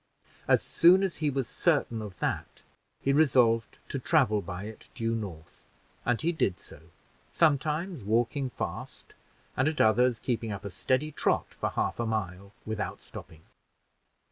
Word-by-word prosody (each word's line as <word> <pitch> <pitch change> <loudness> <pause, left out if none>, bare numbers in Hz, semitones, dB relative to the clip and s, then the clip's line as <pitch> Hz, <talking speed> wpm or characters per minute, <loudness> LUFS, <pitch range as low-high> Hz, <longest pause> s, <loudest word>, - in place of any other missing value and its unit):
As - - +4
soon 180 +4 +5
as 190 -4 -1
he 155 -2 0
was 135 -3 -1
certain 140 -9 +1
of 105 -3 -8
that, - - -3 0.4
he 135 - +2
resolved 125 -6 +3
to 135 - -2
travel 110 -4 +2
by 90 +1 -6
it 110 +1 -10
due 115 0 -1
north, 95 -8 -7 0.4
and 120 -1 +1
he 165 +2 +1
did 130 - 0
so, 80 +3 -13 0.4
sometimes 155 - +1
walking 120 +6 0
fast, - - -6 0.4
and 130 - +2
at 155 0 -1
others 120 +2 +4
keeping 115 -2 -2
up 100 0 -6
a 100 - -5
steady 130 +10 0
trot - - 0
for - - -2
a - - -5
half - - -1
a 115 - 0
mile 100 -3 -3
without 110 -1 -3
stopping. 80 0 -11
120 Hz, 160 wpm, -29 LUFS, 105-145 Hz, 0.4 s, soon